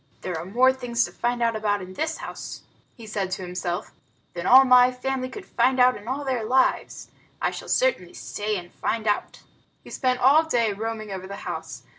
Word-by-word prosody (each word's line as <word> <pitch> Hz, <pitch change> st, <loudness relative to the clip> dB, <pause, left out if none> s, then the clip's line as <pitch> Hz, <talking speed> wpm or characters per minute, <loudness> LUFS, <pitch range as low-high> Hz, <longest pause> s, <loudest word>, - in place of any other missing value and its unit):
"There 180 Hz, -, -4 dB
are 160 Hz, +1 st, -5 dB
more 250 Hz, +7 st, +4 dB
things 240 Hz, -2 st, 0 dB
to -, -, -9 dB
find 240 Hz, 0 st, -1 dB
out 230 Hz, -1 st, +1 dB
about 210 Hz, -1 st, 0 dB
in 185 Hz, -1 st, -9 dB
this 315 Hz, +9 st, -2 dB
house," -, -, -8 dB, 0.3 s
he 230 Hz, -, -12 dB
said 205 Hz, -3 st, -3 dB
to 190 Hz, -, -4 dB
himself, 180 Hz, -1 st, -4 dB, 0.4 s
"than 175 Hz, +1 st, -4 dB
all 265 Hz, +1 st, +8 dB
my 250 Hz, 0 st, +6 dB
family 255 Hz, 0 st, -3 dB
could 395 Hz, +6 st, -9 dB
find 260 Hz, 0 st, +1 dB
out 250 Hz, 0 st, +5 dB
in 205 Hz, -, -11 dB
all 275 Hz, +3 st, -3 dB
their 255 Hz, -4 st, -1 dB
lives. 260 Hz, +4 st, 0 dB, 0.3 s
I -, -, 0 dB
shall -, -, -8 dB
certainly -, -, +1 dB
stay 210 Hz, +1 st, -3 dB
and 175 Hz, -1 st, -9 dB
find 225 Hz, -1 st, -2 dB
out." 210 Hz, -1 st, -1 dB, 0.4 s
He -, -, -13 dB
spent 255 Hz, -2 st, 0 dB
all 275 Hz, +5 st, +6 dB
that 320 Hz, -, -10 dB
day 230 Hz, -6 st, +2 dB
roaming 215 Hz, 0 st, -5 dB
over 190 Hz, -1 st, -6 dB
the 200 Hz, -, -7 dB
house. -, -, -6 dB
235 Hz, 210 wpm, -24 LUFS, 205-260 Hz, 0.4 s, all